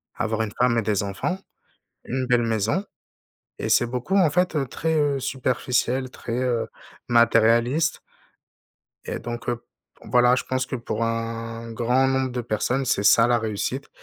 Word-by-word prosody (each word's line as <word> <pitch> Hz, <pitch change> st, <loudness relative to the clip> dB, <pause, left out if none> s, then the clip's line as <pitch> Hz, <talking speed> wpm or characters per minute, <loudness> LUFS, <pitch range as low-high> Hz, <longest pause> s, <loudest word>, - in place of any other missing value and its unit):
avoir 110 Hz, -2 st, -1 dB
une 105 Hz, -, -4 dB
femme 125 Hz, -1 st, +3 dB
et -, -, +3 dB
des 100 Hz, -2 st, 0 dB
enfants, 100 Hz, -, -2 dB, 0.7 s
une 130 Hz, +1 st, -2 dB
belle 125 Hz, -1 st, +3 dB
maison, 115 Hz, -, 0 dB, 0.7 s
et -, -, -3 dB
c'est 120 Hz, -, +4 dB
beaucoup, 125 Hz, +10 st, -2 dB
en 185 Hz, -5 st, +5 dB
fait, 180 Hz, +2 st, +1 dB
heu, 140 Hz, -3 st, 0 dB
très, 160 Hz, +6 st, -2 dB
heu, 145 Hz, -2 st, +1 dB
superficiel, 130 Hz, 0 st, -1 dB
très, 115 Hz, -, -6 dB
heu, 120 Hz, -3 st, 0 dB, 0.4 s
matérialiste. 120 Hz, +5 st, +3 dB, 1.1 s
Et -, -, -4 dB
donc 120 Hz, 0 st, -5 dB
heu, 120 Hz, -, 0 dB
p 115 Hz, -, -25 dB, 0.4 s
voilà, 125 Hz, 0 st, +4 dB
je -, -, -2 dB
pense 130 Hz, 0 st, -1 dB
que 135 Hz, -, -4 dB
pour 115 Hz, -2 st, -3 dB
un 115 Hz, 0 st, -4 dB
grand 125 Hz, +3 st, +2 dB
nombre 130 Hz, -1 st, 0 dB
de 125 Hz, 0 st, -3 dB
personnes, 120 Hz, +4 st, -1 dB
c'est 100 Hz, -, +1 dB
ça 115 Hz, +3 st, +6 dB
la 120 Hz, -1 st, +3 dB
réussite 110 Hz, +5 st, -3 dB
120 Hz, 165 wpm, -24 LUFS, 115-130 Hz, 1.1 s, ça